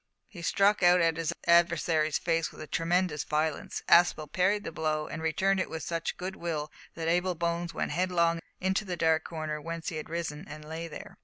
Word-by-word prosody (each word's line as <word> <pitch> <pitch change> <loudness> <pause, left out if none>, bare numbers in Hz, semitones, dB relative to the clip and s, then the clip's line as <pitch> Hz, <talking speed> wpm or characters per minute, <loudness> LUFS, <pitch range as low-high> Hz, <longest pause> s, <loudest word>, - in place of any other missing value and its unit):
He 175 - -11
struck 200 +4 +3
out 180 0 +6
at 165 -1 +2
his 165 -1 -1
adversary's 170 -2 +3
face 165 -1 0
with 155 - -10
tremendous 170 -2 +1
violence. 155 0 -2
Aspel 165 -3 +4
parried 200 +3 +2
the - - -5
blow 155 -1 -1
and 155 +1 -6
returned 190 +4 +1
it 185 - -1
with 160 -2 -5
such 165 -1 -3
good 185 +2 -5
will 155 -3 -3 0.2
that 165 -1 -3
Abel 180 +2 +1
Bones 170 +1 -2
went - - -2
headlong 170 -2 +1 0.2
into 190 +3 0
the 180 -3 -4
dark 160 -1 +2
corner 155 -2 -4
whence 165 +1 -4
he 160 - -5
had 155 - -6
risen, 165 0 -4
and 150 +1 -9
lay 160 +2 -5
there. 160 - -10
165 Hz, 200 wpm, -29 LUFS, 155-175 Hz, 0.2 s, out